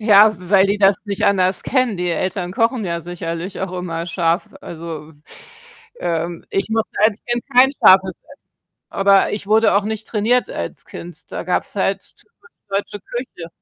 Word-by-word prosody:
Ja, 215 0 +7
w 180 0 -12
weil 195 -1 +6
die 200 +1 +1
das 195 -1 +5
nicht 200 -2 -4
anders 185 -1 +2
kennen. 255 -6 +1
Die 180 0 -2
Eltern 180 +1 -2
kochen 230 +1 +1
ja 170 -2 -2
sicherlich 170 +1 -5
auch 190 -1 -3
immer 170 -1 -4
scharf. 170 0 0
Also, 160 -2 -8 0.9
ähm, 170 0 -3
ich 195 - -1
mochte 225 0 0
als 215 0 +2
Kind 240 0 -2
kein 260 +2 +7
scharfes 190 0 +6
Essen, 285 - -16 0.5
aber 195 0 +3
ich 205 -1 -5
wurde 220 +2 +4
auch 200 - +3
nicht 220 +1 -4
trainiert 235 +3 +1
als - - -6
Kind. 175 0 -11
Da - - -4
gab's - - -2
halt - - -2
typisch 465 +1 -24 0.2
deutsche 200 +1 -3
Küche 240 -7 -7
195 Hz, 170 wpm, -19 LUFS, 175-220 Hz, 0.9 s, Ja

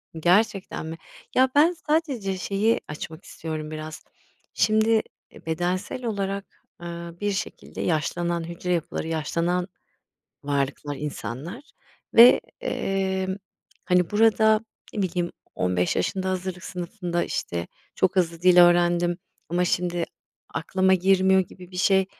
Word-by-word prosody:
Gerçekten 190 +3 +1
mi? 160 +1 -6 0.4
Ya, 260 +1 +5
ben 310 +4 +6 0.2
sadece 270 - 0
şeyi 200 +4 +1
açmak 160 +3 -7
istiyorum 155 -1 -6
biraz. 155 0 -7 0.5
Şimdi, 220 +1 +3 0.3
eee, - - -16
bedensel 175 +9 -2
olarak, 200 -2 -4 0.2
aaa, 170 0 -7
bir 205 0 0
şekilde 200 +1 -5
yaşlanan 170 +1 0
hücre 170 +2 -3
yapıları, 165 -1 -2
yaşlanan 170 +3 -1 0.8
varlıklar 140 0 -1
insanlar 150 - -5 0.5
ve, 235 +2 +9 0.2
emm, 190 -1 -1 0.5
hani, 180 -2 +3
burada, 220 0 +4 0.3
ne 210 - -1
bileyim, 175 -2 -1 0.2
15 90 -1 +1
yaşında 190 -1 -1
hazırlık 185 0 -3
sınıfında, 175 -1 -3
işte, 85 0 -3 0.3
çok 185 - +2
hızlı 170 -3 +1
dil 180 0 +6
öğrendim 175 0 +5 0.3
ama 175 +1 +1
şimdi 175 -1 0 0.5
aklıma 190 +3 +2
girmiyor 190 +1 +4
gibi 180 0 -11
bir 180 - -8
şey. 190 +1 +4
180 Hz, 120 wpm, -25 LUFS, 170-195 Hz, 0.8 s, ve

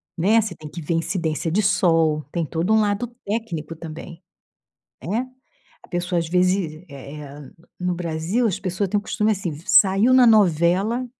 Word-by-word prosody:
né. 205 +7 +3
Você 210 -4 -2
tem 155 -2 -11
que 170 +3 -8
ver 165 - -2
incidência 165 -1 -2
de 210 +4 +1
sol. 165 -5 +2
Tem 170 -2 -1
todo 165 +8 -2
um 220 - +5
lado 210 +3 0 0.2
técnico 180 -8 -4
também, 165 +2 -9 0.8
né. 225 +9 -1 0.6
A - - -18
pessoa, 175 0 -1
às 165 - -1
vezes, 180 -2 0
eh 140 +1 -10
eh 145 -1 -11 0.3
no 180 0 -1
Brasil, 175 +7 -1
as 195 - -1
pessoas 185 +2 -2
têm 205 - 0
o - - -5
costume, 210 +1 0
assim: 190 -3 -3
v 150 +2 -10
saiu 200 +6 +5
na 255 -2 +6
novela 200 +4 +3
175 Hz, 175 wpm, -22 LUFS, 160-205 Hz, 0.8 s, na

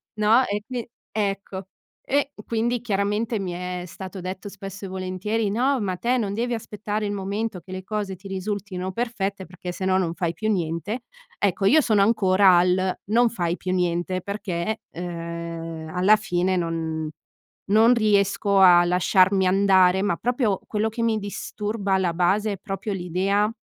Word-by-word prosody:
No, 220 +4 +4
e 205 +1 -2
qui 245 -3 -5 0.2
ecco. 195 -2 -3 0.4
E 285 +1 0
quindi 235 +1 0
chiaramente 210 +1 -1
mi 185 -2 -3
è 180 0 -4
stato 190 +2 -8
detto 185 +2 -6
spesso 195 -1 -9
e - - -5
volentieri: 190 +3 -2
"No, 260 +4 +2
ma 190 -3 -1
te 245 +6 +1
non 205 -4 -1
devi 240 +3 -1
aspettare 210 -1 -4
il 205 - -2
momento 200 0 -3
che 185 +3 -13
le 185 0 -5
cose 205 -2 -3
ti 195 +2 -11
risultino 190 -1 -4
perfette, 200 -3 -3
perché 180 +1 -7
se 185 +1 -5
no 185 0 +3
non 170 -3 0
fai 170 -2 -1
più 215 +4 -1
niente". 185 +6 -2 0.4
Ecco, 195 -1 +1
io 310 +10 +6
sono 215 -8 +3
ancora 195 -3 +5
al 185 +1 +2
"non 235 +1 +4
fai 175 -6 -1
più 185 0 -4
niente". 180 0 0
Perché, 200 0 -3
ehm, 170 -2 -6
alla 190 +4 +6
fine 185 -3 0
non 160 -2 -2 0.6
non 225 +4 +6
riesco 200 -2 +2
a 175 -2 +8
lasciarmi 185 +2 +3
andare, 190 -1 +4
ma 200 -4 0
proprio 240 -5 0
quello 215 +1 0
che 230 +1 -3
mi 225 -1 +2
disturba, 205 0 -3
alla 185 -3 +2
base, 200 +5 +1
è 195 - -6
proprio 195 +3 -5
l'idea 190 +4 +1
195 Hz, 165 wpm, -24 LUFS, 180-215 Hz, 0.6 s, a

